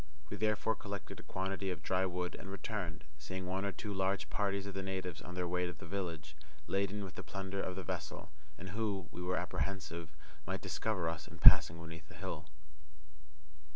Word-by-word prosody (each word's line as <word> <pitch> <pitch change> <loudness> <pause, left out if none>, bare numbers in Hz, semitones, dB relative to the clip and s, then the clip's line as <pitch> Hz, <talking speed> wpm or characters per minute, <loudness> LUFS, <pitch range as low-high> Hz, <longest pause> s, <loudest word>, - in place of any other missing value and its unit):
We - - -2
therefore 110 +1 +3
collected 100 -2 -5
a - - -13
quantity 95 +1 -1
of 90 - -3
dry 95 0 +3
wood 90 0 -1
and 95 - -7
returned, 100 -5 -3 0.2
seeing 95 +5 -4
one 95 +2 0
or 100 - +1
two 105 +1 -4
large 95 0 +1
parties 100 -1 +1
of 100 - -4
the 95 - -1
natives 95 -4 -2
on 90 - -7
their 90 -1 0
way 90 0 +1
to 90 - -3
the 75 - -10
village, 85 -5 -3 0.3
laden 100 +1 +1
with 95 - -6
the - - -5
plunder 95 0 -3
of 90 - -2
the 95 - -3
vessel, - - -4 0.3
and 95 +2 -6
who, 100 -2 -1
we - - -6
were 90 +1 +1
apprehensive, 85 -4 -2 0.4
might - - -1
discover 95 -6 0
us 80 0 -2
in - - -10
passing 85 +1 +10
beneath 80 -2 -8
the 75 - -12
hill. 85 -4 -4
95 Hz, 195 wpm, -36 LUFS, 85-100 Hz, 0.4 s, passing